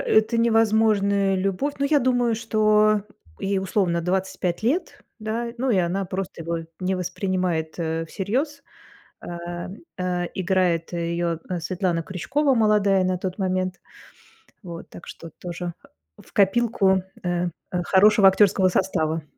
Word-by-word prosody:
это 220 +2 +2
невозможная 215 -3 +3
любовь. 195 +10 -1
Ну, 280 - +1
я 300 0 +4
думаю, 245 -3 +2
что 215 -2 +3 0.4
ей, 195 0 0
условно, 190 -3 0
25 180 0 -2
лет, 275 +11 -1 0.2
да. 225 +2 -3
Ну 260 +1 0
и 220 - +3
она 180 +3 0
просто 185 -2 -5
его 170 +1 -2 0.2
не 185 +1 0
воспринимает, 180 -3 -2
э, 165 0 -2
всерьёз. 270 - -2 0.6
Э, 175 0 -6 0.3
э, 180 -1 -1
играет 180 -3 0
ее, 170 -1 -1
э, 180 -2 -2
Светлана 175 0 -1
Крючкова, 270 - 0
молодая 210 -4 +3
на 185 0 0
тот 185 +1 -4
момент, 185 -1 -1 0.8
вот, 170 -4 -9
так 170 - -12
что 165 - -9
тоже 175 0 -5 0.4
в - - -18
копилку, 195 -2 +3 0.2
э, 175 0 0 0.2
э, 180 -1 -1
хорошего 200 +2 +5
актерского 190 -1 +4
состава. 165 -4 0
190 Hz, 135 wpm, -24 LUFS, 175-215 Hz, 0.8 s, хорошего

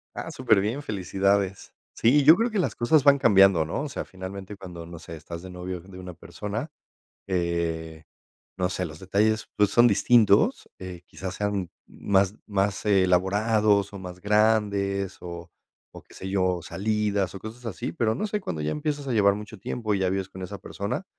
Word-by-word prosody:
Ah, 165 - -5
superbién, 120 -1 +1
felicidades. 100 -1 -1 0.2
Sí, 135 +5 +4
yo 160 +4 +9
creo 230 +2 0
que 210 - 0
las - - 0
cosas 140 +4 +3
van 140 -1 +6
cambiando, 95 - +5
¿no? 85 - -3
O 150 - -4
sea, - - -5
finalmente, 95 +2 -8
cuando, 90 -3 -9
no 85 -1 -10
sé, 85 - -9
estás 85 +2 -8
de 95 - -9
novio 90 0 -6
de 90 +1 -13
una 90 -1 -8
persona, 105 - -6 0.6
eh, 85 -3 -2 0.5
no 90 0 +1
sé, 90 - -2
los 75 0 -10
detalles, 105 +4 +1
pues, 105 -1 +3
son 120 0 +6
distintos, 105 0 +4
eh, 90 -2 -8
quizás 95 -1 -7
sean 100 -4 -2 0.2
más 100 0 +1
más 100 -1 -1
elaborados 100 +2 +3
o - - -6
más 90 -1 -9
grandes 100 -2 +1
o 85 -1 -8 0.4
o - - -11
qué - - -22
sé 95 - -7
yo, 90 -2 +1
salidas 100 -1 -1
o - - -6
cosas 115 +4 -10
así, 95 -6 -4
pero 110 +5 0
no 215 - -2
sé, 210 0 -2
cuando 80 - -4
ya 75 - -1
empiezas 145 -2 -3
a - - 0
llevar 100 -2 +4
mucho 105 +1 -8
tiempo 110 +2 -2
y 95 - -1
ya 95 -1 +1
vives 95 -1 -2
con 95 -1 -10
esa 100 +2 -6
persona, 100 - -4
100 Hz, 185 wpm, -26 LUFS, 90-110 Hz, 0.6 s, yo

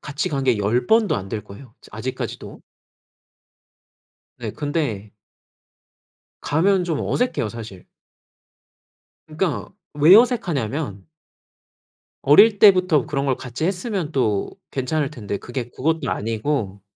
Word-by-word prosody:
같이 145 0 -3
간 140 -3 -2
게 125 -5 +2
10 105 +5 0
번도 220 -2 +3
안 95 0 -6
될 105 0 -4
거예요 110 +4 -13
저 - - -17
아직까지도. - - -6 1.8
네 - - -5
근데 145 -10 -3 1.3
가면 185 +5 +2
좀 165 -4 -2
어색해요 245 - -1
사실. 110 -5 -9 1.4
그러니까 155 +1 -2 0.2
왜 150 +5 +7
어색하냐면 150 - 0 1.2
어릴 205 +9 +6
때부터 185 -7 +5
그런 140 -2 -2
걸 130 -2 +1
같이 125 +4 -5
했으면 185 -3 -2
또 110 -7 0 0.2
괜찮을 140 +3 -1
텐데 105 -8 -5
그게 120 +2 -6
그것도 155 +2 -1
아니고 110 -2 -2
140 Hz, 235 characters per minute, -22 LUFS, 115-170 Hz, 1.8 s, 왜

